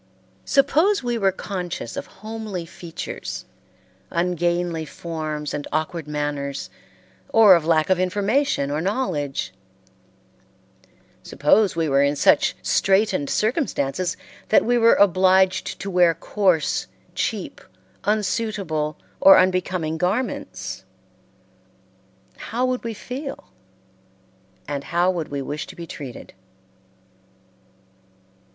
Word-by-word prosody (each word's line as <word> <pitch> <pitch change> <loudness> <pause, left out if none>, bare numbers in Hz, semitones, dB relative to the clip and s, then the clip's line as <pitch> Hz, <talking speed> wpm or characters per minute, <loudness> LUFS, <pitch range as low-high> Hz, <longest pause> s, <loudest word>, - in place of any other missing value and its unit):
Suppose 305 +7 +3
we 240 -1 -1
were 195 -2 +3
conscious 180 -9 -5
of - - -5 0.2
homely 215 -5 -5
features, 165 -1 -7 0.6
ungainly 175 -1 0
forms 155 -1 -5
and 145 -1 -4
awkward 155 0 -2
manners, 145 -2 -3 0.6
or 225 -7 +7
of 170 -3 +3
lack 160 +1 +3
of 185 - +3
information 200 - +1
or 150 +2 -1
knowledge; 165 - -2 1.7
suppose 190 +7 +2
we 165 -1 0
were 140 -1 +3
in 140 +1 +2
such - - +3
straitened 195 -6 +2
circumstances 185 - -1 0.3
that - - +4
we 245 +1 +2
were 230 -1 +5
obliged 190 -1 +3
to 195 - -4
wear 175 -2 +4
coarse, 180 -2 +1 0.3
cheap, - - -3 0.4
unsuitable 200 -8 -1 0.2
or 195 - +8
unbecoming 180 -3 +1
garments 205 +9 -2 1.5
how 245 +3 -2
would 255 0 -1
we 230 -1 -4
feel 270 +6 -7 1.2
and 140 -1 -4
how 175 +2 +2
would 170 -4 -3
we 140 -1 -4
wish 145 +2 -5
to - - -11
be 170 - -7
treated? 135 -7 -9
180 Hz, 105 wpm, -23 LUFS, 155-210 Hz, 1.7 s, or